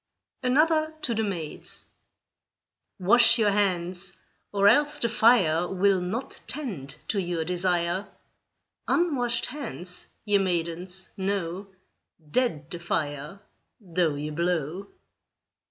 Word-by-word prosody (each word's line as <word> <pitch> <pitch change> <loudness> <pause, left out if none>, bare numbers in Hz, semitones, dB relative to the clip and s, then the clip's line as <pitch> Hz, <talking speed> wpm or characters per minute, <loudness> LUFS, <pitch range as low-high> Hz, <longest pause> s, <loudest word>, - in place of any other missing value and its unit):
ANOTHER 310 +4 +2
TO 235 - +1
THE 225 - 0
MAIDS 175 -8 -4 1.1
Wash 235 +5 +6
your 215 -3 +3
hands, 185 -2 -1 0.4
or 200 0 +3
else 295 +5 +4
the 240 - 0
fire 190 -8 +4
Will 190 0 +3
not 225 +9 -4
tend 185 - -4
to 200 - +1
your 170 -3 -2
desire; 180 +1 0 0.8
Unwashed 265 -9 +1
hands, 180 - -5 0.2
ye 205 -1 +3
maidens, 180 0 -2
know, 190 -1 -2 0.6
Dead 240 - 0
the 175 - -4
fire, 155 +1 -3 0.4
though 175 -6 0
ye 150 +1 -4
blow. 170 +2 -1
190 Hz, 105 wpm, -26 LUFS, 170-230 Hz, 1.1 s, Wash